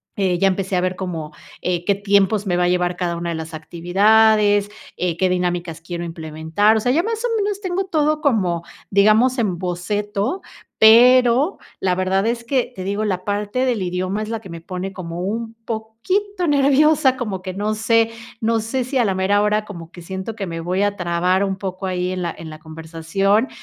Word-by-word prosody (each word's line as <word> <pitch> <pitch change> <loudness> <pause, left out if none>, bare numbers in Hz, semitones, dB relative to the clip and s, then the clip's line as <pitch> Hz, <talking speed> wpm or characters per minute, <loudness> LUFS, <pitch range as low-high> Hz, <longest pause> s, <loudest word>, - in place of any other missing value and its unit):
eh, 185 -3 +1
ya 195 - +3
empecé 190 0 -1
a 180 - +2
ver 185 0 -1
como, 165 -5 -5 0.3
eh, 175 -1 -1
qué 200 - +2
tiempos 200 0 +2
me 180 - 0
va 180 - +2
a - - +2
llevar 180 0 +1
cada 175 -2 -1
una 170 0 -3
de - - -3
las 160 0 -6
actividades, 205 +5 +3 0.3
eh, 175 -2 -1
qué 185 -1 +2
dinámicas 175 -2 -2
quiero 175 0 -5
implementar. 160 +6 0
O - - +1
sea, 245 - +1
ya 325 +7 +2
más 450 +1 -3
o 460 -2 0
menos, 405 -1 -1
tengo 370 0 -2
todo 305 -3 +1
como, 185 - +1 0.3
digamos, 215 +6 +4
en 195 -7 0
boceto, 205 - -2 0.4
pero 250 - +6 0.2
la 185 -1 +2
verdad 190 +2 0
es 235 0 -1
que, 255 0 0
te 185 - -7
digo, 205 +2 -1
la 185 -3 -2
parte 205 +5 -1
del 235 -6 0
idioma 185 +3 -2
es 215 - -7
la 225 - -3
que 205 -4 -13
me 170 -1 -8
pone 185 +3 -5
como 170 -2 -6
un 225 +3 -3
poquito 345 - -2
nerviosa, 285 -1 +4
como 210 -7 -4
que 185 0 -6
no 210 +3 -2
sé, 225 +1 +2 0.3
no 225 0 +1
sé 240 +3 -2
si 265 +1 -2
a 245 - +4
la 200 -4 +1
mera 190 +2 +2
hora 210 0 +1
como 170 -5 -10
que 175 - -12
siento 190 +5 -6
que 195 - -4
me 165 -1 -5
voy 180 +4 0
a 205 0 0
trabar 180 +2 +1
un 190 -1 -2
poco 190 0 -5
ahí 180 0 -1
en 185 - -4
la, 170 -1 -2
en 165 - -8
la 155 0 -10
conversación, 165 +8 -1
200 Hz, 210 wpm, -20 LUFS, 180-225 Hz, 0.4 s, pero